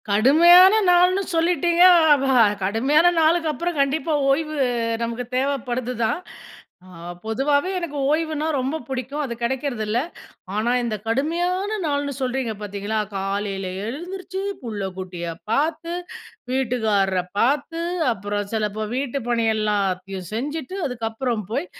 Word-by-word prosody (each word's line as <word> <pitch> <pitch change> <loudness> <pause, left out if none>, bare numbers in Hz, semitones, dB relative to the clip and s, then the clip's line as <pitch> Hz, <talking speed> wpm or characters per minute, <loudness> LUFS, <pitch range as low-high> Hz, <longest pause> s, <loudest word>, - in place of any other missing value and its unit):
கடுமையான 340 - +7 0.2
நாள்ன்னு 360 +2 +4
சொல்லிட்டீங்க? 345 +1 +3 0.3
அப்பா, 275 -1 +1 0.3
கடுமையான 265 - +3
நாளுக்கப்பறம், 325 0 +1
கண்டிப்பா 310 +3 0 0.2
ஓய்வு 305 +2 -1 0.5
நமக்கு 235 +1 -3
தேவைப்படுதுதான். 255 0 -1 0.7
ஆ - - -14 0.3
பொதுவாவே 285 +9 +1
எனக்கு 335 -5 -5
ஓய்வுன்னா 310 0 0
ரொம்பப் 270 +3 -3
பிடிக்கும் 265 +3 -3
அது 255 -5 -3
கடைக்றது 255 -1 -2
இல்ல. 215 +3 0 0.6
ஆனா, 220 +3 0
இந்த 235 -2 -2
கடுமையான 350 - 0
நாள்ன்னு 285 -1 -1
சொல்றீங்க 255 -2 -1
பாத்தீங்களா, 205 +1 -3 0.2
காலைல 195 0 -3 0.2
எழுந்திருச்சு, 365 - -6 0.2
பிள்ளைக்குட்டியப் 185 -6 -5
பாத்து, 315 +6 0 0.6
வீட்டுக்காரரப் 215 -8 0
பாத்து, 290 +7 +1 0.3
அப்புறம் 205 -1 -4
சிலப்போ 215 -1 -2
வீட்டுப்பணியெல்லாத்தையும் 215 -8 -1
செஞ்சிட்டு, 290 - -4
அதுக்கப்புறம் 230 -2 -3
போய் 285 +9 -1
260 Hz, 100 wpm, -22 LUFS, 220-315 Hz, 0.7 s, கடுமையான